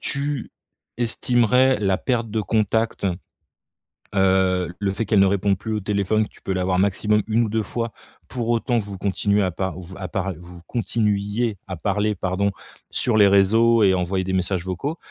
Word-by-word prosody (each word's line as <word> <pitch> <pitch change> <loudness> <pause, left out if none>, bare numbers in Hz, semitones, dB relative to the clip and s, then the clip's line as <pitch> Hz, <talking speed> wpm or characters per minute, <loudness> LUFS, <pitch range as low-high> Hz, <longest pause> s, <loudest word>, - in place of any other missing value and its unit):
Tu 140 -2 -2 0.5
estimerais 120 +2 +3
la 95 -2 +1
perte 120 -3 -1
de 110 0 -1
contact, 110 0 0 1.1
heu, 95 -2 +2
le 100 -1 -1
fait 110 +2 -2
qu'elle 105 - +3
ne 100 - +6
réponde 100 0 +1
plus 110 0 -4
au 105 - -1
téléphone, 105 +2 0
tu - - -21
peux 95 - -2
l'avoir 90 0 0
maximum 105 +2 +2
1 115 +2 +2
ou 110 - -2
2 110 +1 0
fois, 115 +1 -4 0.4
pour 120 -2 -4
autant 120 0 +1
que - - -3
vous 100 -2 -7
continuez 100 +1 +1
à 95 - 0
par 95 0 -4
vous 95 +2 -10
à 95 - -5
par 95 +1 -3
vous 85 0 -13
continuiez 110 -1 -1
à 95 - -5
parler, 105 +3 0
pardon, 95 +2 -1 0.4
sur 115 -3 +2
les 100 -1 +7
réseaux 110 +4 +4
et 95 -1 +5
envoyer 95 +1 -1
des 95 0 -3
messages 95 -1 0
vocaux. 135 - -3
100 Hz, 185 wpm, -22 LUFS, 95-115 Hz, 1.1 s, les